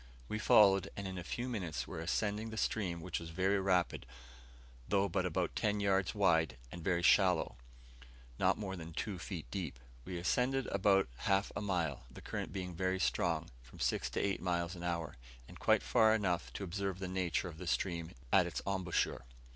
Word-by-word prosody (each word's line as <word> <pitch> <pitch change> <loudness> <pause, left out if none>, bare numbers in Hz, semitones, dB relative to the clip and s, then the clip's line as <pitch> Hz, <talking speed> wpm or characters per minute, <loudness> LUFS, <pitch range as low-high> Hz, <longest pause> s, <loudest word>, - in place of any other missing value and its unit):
We 110 - -3
followed, 100 -3 +6
and 100 -1 -3
in 95 -1 -5
a - - -6
few 120 +8 -3
minutes 95 -10 -3
were - - -6
ascending 105 +6 -1
the 110 - -7
stream, 90 -7 -1
which 90 0 -3
was 85 0 -7
very 95 +4 +1
rapid, 90 -8 +1 0.8
though 100 0 +2
but 95 0 0
about 90 0 -1
ten 105 -1 +1
yards 95 -1 +1
wide, 80 -9 +3
and 85 -2 -8
very 85 0 +1
shallow; 90 -2 +4 0.8
not - - +3
more 95 -2 -4
than 85 -2 -8
two 100 +2 -3
feet 85 -3 -5
deep. 85 -11 -4 0.3
We 90 +3 -5
ascended 125 +9 +1
about 95 0 +3
half 95 +6 +1
a - - -2
mile, 85 -9 -1
the - - -11
current - - -4
being 90 -2 -4
very 95 +2 0
strong, 65 -5 0
from - - -15
six - - 0
to - - +1
eight 100 -1 0
miles 85 -1 -1
an 85 - -9
hour, 85 -6 -3 0.3
and - - -12
quite - - +3
far 110 0 +5
enough 90 -5 -1
to - - -5
observe 95 0 -2
the 95 0 -4
nature 90 -1 -1
of 80 -2 -9
the 90 - -6
stream 85 -1 -1 0.2
at - - +6
its - - -3
embouchure. 95 -9 -1
95 Hz, 190 wpm, -35 LUFS, 85-100 Hz, 0.8 s, followed